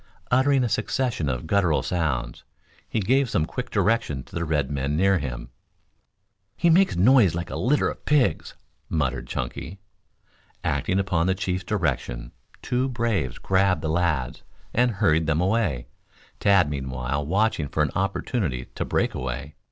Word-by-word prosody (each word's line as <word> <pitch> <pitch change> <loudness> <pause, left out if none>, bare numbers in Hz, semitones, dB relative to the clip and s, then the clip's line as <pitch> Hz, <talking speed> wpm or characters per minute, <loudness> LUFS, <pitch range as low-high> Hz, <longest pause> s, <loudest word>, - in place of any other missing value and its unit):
Uttering 130 +1 +4
a - - +1
succession 110 - -1
of 65 +2 -3
gutteral 90 -3 +2
sounds, 70 -9 -2 0.5
he 115 - 0
gave 130 +5 +2
some 80 -7 +1
quick 125 +7 -5
directions 95 - 0
to - - -11
the 85 0 -1
red 75 -3 0
men 70 +1 -1
near 95 +1 +3
him. 65 -4 -6 1.1
"He 170 - +3
makes 190 +4 +4
a - - -2
noise 105 - +5
like 85 +2 -4
a - - -4
litter 145 +4 +2
of - - -6
pigs," 150 -4 +1 0.3
muttered 65 -5 -1
Chunky. 80 +11 -5 0.8
Acting 95 - 0
upon 95 -3 +1
the 95 - +2
chief's 95 0 -2
direction 65 - -2 0.3
two 125 +2 0
braves 115 - -1
grabbed 95 -3 +1
the 80 - -1
lads, 80 -6 0 0.3
and 125 +1 +3
hurried 80 -6 +2
them 80 0 +1
away, 90 - 0 0.5
Tad 100 -5 +4
meanwhile 65 0 -3
watching 95 -1 +1
for - - 0
an - - -1
opportunity 95 - -1
to - - -2
break - - 0
away. 65 +3 -5
90 Hz, 155 wpm, -25 LUFS, 70-110 Hz, 1.1 s, noise